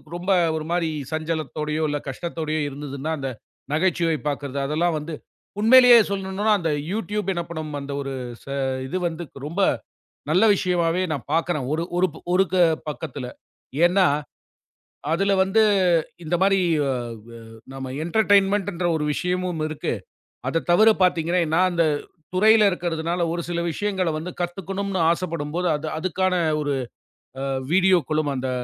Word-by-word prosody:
ரொம்ப 175 +2 -5 0.3
ஒரு 155 -1 -3
மாரி 170 -2 +1 0.2
சஞ்சலத்தோடயோ, 155 -1 -2
இல்ல 145 - -1
கஷ்டத்தோடயோ 155 +1 -3
இருந்ததுன்னா, 140 +1 -5
அந்த 135 -2 -3 0.4
நிகழ்ச்சியைப் 165 -2 +1
பாக்குறது 140 -1 -3
அதெல்லாம் 160 +4 0
வந்து 155 +2 -7 0.5
உண்மையிலேயே 245 +2 +8
சொல்லணும்னா 200 +2 0
அந்த 165 -2 -1 0.2
YouTube 210 -1 -2
என்ன 170 - -2
பண்ணும்? 155 -2 -5
அந்த 140 0 -7
ஒரு 135 -1 -4 0.3
ச - - -21 0.4
இது 165 - -2
வந்து 170 0 -5 0.2
ரொம்ப 170 +7 -2 0.7
நல்ல 180 +7 +4
விஷயமாவே 180 -2 +1
நான் 145 -5 -3
பார்க்குறேன். 165 -4 0
ஒரு 160 +2 0
ஒரு 185 +1 +3 0.3
ஒரு 190 +1 +4 0.4
பக்கத்துல. 145 -4 -6 0.6
ஏன்னா 185 +2 +4 1.1
அதுல 195 +4 +2
வந்து 195 +4 +3 0.6
இந்த 165 +2 0
மாரி 195 0 +4 0.3
அ - - +1 0.3
வ - - -13 0.4
நம்ம 135 -1 -6
என்டேர்டைன்மெண்ட் 200 +1 +3
என்ற 175 +1 -1
ஒரு 150 - -2
விஷயமும் 180 -1 -2
இருக்கு. 155 -1 -3 0.6
அத 165 - 0
தவிர 215 +6 +6
பாத்தீங்கன்னா, 175 0 +2 0.2
நா - - +4
அந்தத் 160 -4 +1 0.3
துறையில 215 +2 +6
இருக்குறதுனால 170 -1 -2
ஒரு 170 - -2
சில 170 -1 -1
விஷயங்கள 190 0 -1
வந்து 165 +4 -5
கத்துக்கணும்னு 190 +2 -3
ஆசைப்படும்போது, 170 0 -2
அது 150 +2 -6
அதுக்கான 185 +2 0 0.3
ஒரு 145 -1 -1 1.0
வீடியோகுளம் 170 -5 +3
அந்த 130 0 -2
170 Hz, 130 wpm, -23 LUFS, 155-190 Hz, 1.1 s, உண்மையிலேயே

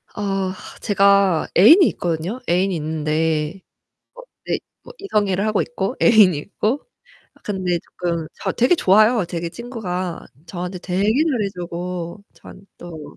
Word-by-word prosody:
아 195 -2 -2 0.3
제가 200 -4 +3
애인이 320 - +8
있거든요? 175 +7 -3
애인이 185 +2 +2
있는데 155 +2 -1 0.5
어 - - -11 0.3
예 - - 0 0.3
뭐 - - -11
이성애를 205 - 0
하고 215 -2 +1
있고 245 -1 -3
애인이 210 -8 +6
있고 215 - -2 0.6
근데 185 -4 -1
쪼끔 170 -2 -4
자 - - -3
되게 250 +9 +3
좋아요. 215 - +4
되게 170 0 -4
친구가 185 -7 -5 0.2
저한테 180 +1 -5
되게 185 +2 -2
잘해 235 0 +1
주고 175 +1 -6
저한테 195 - -14
또 160 -4 -10
190 Hz, 275 characters per minute, -20 LUFS, 170-215 Hz, 0.6 s, 애인이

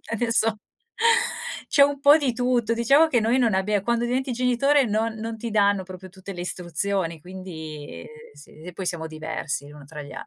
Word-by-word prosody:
adesso 225 -1 +1 1.2
c'è 285 - +5
un 280 -1 -1
po' 290 +2 +7
di 265 -5 -1
tutto. 240 -2 +1
Diciamo 275 +7 +4
che 245 - +2
noi 230 +3 +2
non 230 -6 +2
abbie 200 +1 +1
quando 235 +3 0
diventi 255 +2 -1
genitore 255 +3 +2
non 220 +1 -1
non 225 +1 -6
ti 230 +1 -5
danno 200 -2 +2
proprio 185 0 -11
tutte 190 +1 -10
le 175 - -5
istruzioni, 175 -1 -2
quindi, 160 - -9
ehm, - - -11 0.3
s 145 - -14
e 170 +4 -11
poi 190 - -5
siamo 165 -2 -2
diversi 155 -2 -4
l'uno 145 -1 -13
tra 150 0 -8
gli 145 - -11
an - - -8
205 Hz, 195 wpm, -24 LUFS, 175-240 Hz, 1.2 s, po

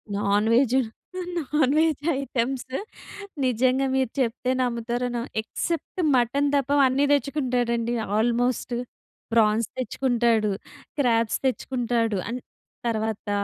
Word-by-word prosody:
Non 205 +1 +1
veg 255 +1 +4 0.6
non 295 -3 +1
veg 315 -3 +2 0.2
items. 260 0 -2 0.7
నిజంగా 255 +2 +2
మీరు 260 -3 +1
చెప్తే 250 0 0
నమ్ముతారు 240 0 -1
న - - 0 0.2
ఎక్సెప్ట్ 335 +10 -3
మటన్ 265 +4 +2
తప్ప 275 -1 +1 0.2
అన్నీ 270 +2 +2
తెచ్చుకుంటాడండి 245 -5 0 0.2
ఆల్మోస్ట్. 240 +2 +1 0.6
ప్రాన్స్ 220 0 +3
తెచ్చుకుంటాడు, 240 -4 +1 0.5
క్రాబ్స్ 230 -5 +2
తెచ్చుకుంటాడు, 240 -3 0
అండ్ 245 +2 -4 0.5
తర్వాత 220 -2 -2
245 Hz, 100 wpm, -25 LUFS, 230-265 Hz, 0.7 s, veg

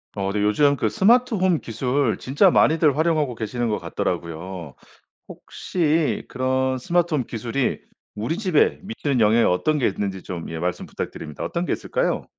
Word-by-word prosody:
어 100 - -2
근데 105 0 -1
요즘 140 +7 +3
그 - - 0
스마트홈 210 -5 +3
기술 125 +1 -1
진짜 145 +9 +3
많이들 155 -4 +4
활용하고 155 -5 +1
계시는 115 +1 -3
것 105 - -1
같더라고요. 85 -3 -4 0.5
혹시 160 -3 -1
그런 130 0 0
스마트홈 160 -1 0
기술이 120 +3 -2 0.3
우리 115 +11 -2
집에 185 -7 +2
미치는 150 - -2
영향이 110 +2 +4
어떤 150 +13 +1
게 125 - +2
있는지 95 -1 -3
좀 85 -3 -6
예 80 - -5
말씀 90 +1 -2
부탁드립니다. 75 -1 -6
어떤 170 +1 -2
게 - - 0
있을까요? - - -1
130 Hz, 360 characters per minute, -23 LUFS, 105-165 Hz, 0.5 s, 많이들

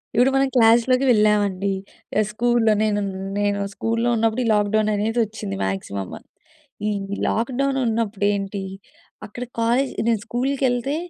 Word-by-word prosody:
ఇప్పుడు 250 +3 +4
మనం‌ 270 0 +3
క్లాస్‌లోకి 240 +3 +4
వెళ్ళామండి. 205 -3 +2 0.5
ఏ - - +5
స్కూల్‌లో 235 0 +2
నేను 210 -1 +1 0.4
నేను 205 0 0
స్కూల్‌లో 230 +3 -1
ఉన్నప్పుడు 225 +2 +1
ఈ - - 0
లాక్‌డౌననేది 215 +2 +1
వచ్చింది 205 - -6
మాక్సిమం. 95 0 -4 0.8
ఈ - - 0 0.4
లాక్‌డౌనున్నప్పుడు 230 -4 0
ఏంటి, 195 0 -3 0.6
అక్కడ 240 +4 -7 0.2
కాలేజ్ 245 +4 +2 0.2
నేను 230 -2 +2
స్కూల్‌కెళ్తే 260 +1 0
225 Hz, 115 wpm, -22 LUFS, 205-245 Hz, 0.8 s, ఏ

